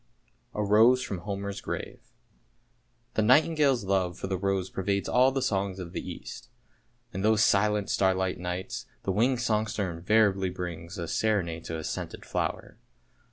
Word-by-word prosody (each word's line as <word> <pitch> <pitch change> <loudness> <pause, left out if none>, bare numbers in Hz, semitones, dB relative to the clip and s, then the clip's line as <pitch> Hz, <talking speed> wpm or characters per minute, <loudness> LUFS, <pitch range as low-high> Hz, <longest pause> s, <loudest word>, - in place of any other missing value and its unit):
A 105 - 0
ROSE 115 +5 +5
FROM 95 - -4
HOMER'S 100 +1 -4
GRAVE - - -5 1.1
THE - - +1
nightingale's 140 +1 +4
love 95 -2 0
for - - -5
the 95 0 -1
rose 95 0 -1
pervades 100 +1 -1
all 130 +2 +4
the 135 -1 -1
songs 95 -1 -1
of 90 -3 -7
the - - -3
East; - - -8 0.6
in 95 - -3
those 110 +1 +4
silent 105 0 +3
starlight 95 -1 +1
nights 90 +1 -4 0.2
the 95 - 0
winged 120 +5 +2
songster 105 -5 0
invariably 95 +2 +2
brings 90 0 -6
a 85 -2 -4
serenade 85 -7 0
to 80 - -4
his 80 -1 -4
scented - - -5
flower. - - -3
100 Hz, 155 wpm, -28 LUFS, 95-110 Hz, 1.1 s, ROSE